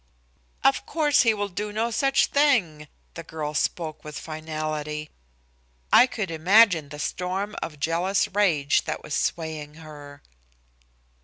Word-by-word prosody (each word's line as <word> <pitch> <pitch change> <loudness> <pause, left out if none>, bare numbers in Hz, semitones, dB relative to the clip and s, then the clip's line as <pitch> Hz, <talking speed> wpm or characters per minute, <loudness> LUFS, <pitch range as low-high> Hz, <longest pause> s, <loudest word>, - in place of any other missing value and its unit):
"Of 270 - +3
course 300 -3 +3
he 230 - +4
will 205 -1 -2
do 205 +2 -5
no 225 +3 -1
such 270 +4 +2
thing." 210 - +1 0.3
The 165 - -7
girl 155 -2 -5
spoke 155 +1 -2
with 150 0 -8
finality. 155 -1 -5 0.8
I 250 - +8
could 210 -8 -4
imagine 175 -1 +4
the 150 - -9
storm 185 +7 -3
of 150 -3 -6
jealous 175 +6 +1
rage 175 -8 +2
that - - -4
was - - -7
swaying 155 -2 -3
her. 145 -3 -12
165 Hz, 135 wpm, -25 LUFS, 150-210 Hz, 0.8 s, I